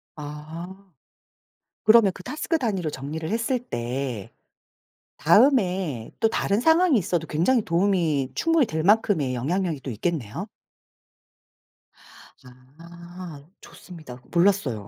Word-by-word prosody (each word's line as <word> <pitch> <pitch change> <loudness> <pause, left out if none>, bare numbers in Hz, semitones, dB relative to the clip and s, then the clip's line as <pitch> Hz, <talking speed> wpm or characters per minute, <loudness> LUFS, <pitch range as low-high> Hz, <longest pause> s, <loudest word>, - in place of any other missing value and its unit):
아. 160 +6 -9 0.9
그러면 215 -2 +6
그 180 - -11
태스크 315 - -2
단위로 195 - -2
정리를 150 +3 -5
했을 230 +4 0
때 125 - -4 0.9
다음에 180 - +2
또 225 - +3
다른 210 -1 0
상황이 320 -3 +4
있어도 170 -3 -2
굉장히 210 +10 +2
도움이 170 -6 +1
충분히 330 -5 +2
될 160 -4 -3
만큼의 190 - +2
영향력이 160 +4 -1
또 130 - -6
있겠네요. 155 - -3 2.3
아 170 -2 -11 0.2
좋습니다. 155 -9 -12
몰랐어요. 170 - +1
175 Hz, 240 characters per minute, -24 LUFS, 150-205 Hz, 2.3 s, 그러면